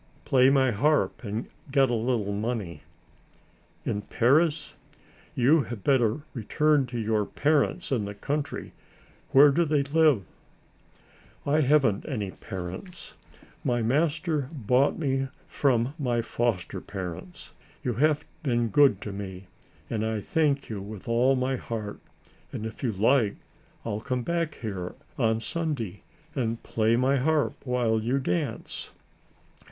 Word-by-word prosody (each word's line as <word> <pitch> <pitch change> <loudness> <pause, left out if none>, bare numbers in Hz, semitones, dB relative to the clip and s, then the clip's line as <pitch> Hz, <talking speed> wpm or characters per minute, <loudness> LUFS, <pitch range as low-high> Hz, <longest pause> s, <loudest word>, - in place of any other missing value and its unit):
"Play 130 0 +5
my 135 -2 +4
harp 145 +8 +1
and 110 +2 -3 0.2
get 135 -2 +3
a - - +1
little 115 -3 0
money." 105 -7 -3 1.0
"In 105 - -1
Paris? 150 +9 +2 0.6
You 145 +6 +5
had 110 -4 -7
better 130 -1 +2
return 145 +4 +2
to 120 0 -5
your 110 -1 +1
parents 150 - +1
in 115 -6 +1
the 100 0 -6
country. 145 +7 -3 0.6
Where 145 +2 +7
do 170 +5 +3
they 150 -3 +2
live?" 145 -6 +3 1.2
"I 150 +2 +3
haven't 135 -7 +3
any 105 -8 -2
parents. 95 - -7 0.5
My 120 -2 +1
master 150 +2 +1
bought 130 -1 +2
me 135 -3 0 0.2
from 125 -2 +1
my 120 -4 0
foster 115 -5 -1
parents. 90 -2 -7 0.3
You 125 - 0
have 150 +5 +2 0.2
been 120 -6 +1
good 135 -5 +4
to 105 - -5
me 95 -1 -7 0.4
and 110 -1 -2
I 110 -1 -1
thank 145 +4 +1
you 105 -3 -5
with 100 0 -9
all 120 +3 +3
my 130 +1 0
heart 110 -4 -5 0.5
and, 110 - -5
if 110 - -7
you 125 - 0
like, 110 +1 +3 0.5
I'll 105 +1 -2
come 125 0 -2
back 170 +1 -1
here 95 -6 -5 0.2
on 110 -2 +2
Sunday 135 - -3 0.3
and 115 -4 -2
play 110 +1 +2
my 130 +3 +3
harp 150 +3 +2
while 120 -3 +1
you 120 +5 0
dance." 90 -10 -3
125 Hz, 135 wpm, -27 LUFS, 110-140 Hz, 1.2 s, Where